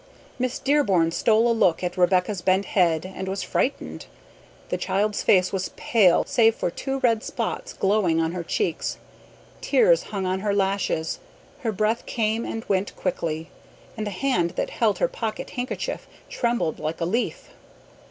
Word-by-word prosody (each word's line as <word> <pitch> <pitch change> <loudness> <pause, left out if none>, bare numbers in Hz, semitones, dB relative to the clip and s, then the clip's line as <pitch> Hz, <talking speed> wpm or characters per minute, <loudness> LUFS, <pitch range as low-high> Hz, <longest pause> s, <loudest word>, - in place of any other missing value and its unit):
Miss 255 +2 -1
Dearborn 245 - +2
stole 225 +5 +3
a - - +4
look 185 -7 +2
at 175 0 -2
Rebecca's 180 +1 +2
bent 190 +2 +2
head 170 -4 +2
and 190 0 -6
was 190 0 -2
frightened. 275 - -2 0.6
The - - -1
child's 205 +2 0
face 185 0 +3
was 190 -1 -1
pale 200 -7 +4
save 225 -1 +4
for - - -2
two 270 +8 -3
red 230 -3 +2
spots - - -3
glowing 190 -5 +2
on 165 0 +1
her 180 0 -4
cheeks. 415 - -1 0.6
Tears - - +4
hung 195 -3 -3
on 185 +1 0
her 200 0 0
lashes; 195 -5 0 0.4
her 230 -4 -1
breath 215 +3 0
came 225 0 0
and 225 - -5
went 195 0 0
quickly, 165 -3 -3 0.4
and 215 -1 -3
the - - -1
hand 185 -5 0
that - - -2
held 215 -5 +1
her - - +2
pocket 225 -2 -5
handkerchief 250 +1 -4 0.2
trembled 235 - 0
like 155 +1 -3
a 165 - 0
leaf. 225 +8 -2
200 Hz, 160 wpm, -24 LUFS, 180-230 Hz, 0.6 s, a